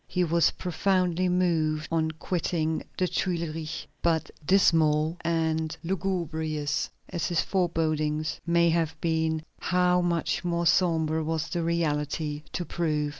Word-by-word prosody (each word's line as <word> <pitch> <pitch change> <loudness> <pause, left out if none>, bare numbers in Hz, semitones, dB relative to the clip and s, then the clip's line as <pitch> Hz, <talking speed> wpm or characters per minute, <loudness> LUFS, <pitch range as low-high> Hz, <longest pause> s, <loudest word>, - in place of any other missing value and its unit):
He 180 - 0
was 170 0 +3
profoundly 185 0 0
moved 160 -4 +1
on 160 -1 +1
quitting 160 0 -1 0.2
the 185 - +2
Tuileries, 165 -4 -2 0.2
but, 165 -2 +1
dismal 160 -3 +3
and 160 -1 0
lugubrious 160 -5 -1 0.2
as 170 -3 -2
his 170 -2 +1
forebodings 155 -4 0
may 170 0 +3
have 165 -2 0
been, 160 -1 0 0.2
how 180 0 +2
much 170 0 0
more 170 -1 0
sombre 160 -3 +2
was 160 +1 -2
the 175 -3 -1
reality 150 -2 -1
to 175 - -3
prove! 155 -4 -1
165 Hz, 125 wpm, -27 LUFS, 155-175 Hz, 0.2 s, was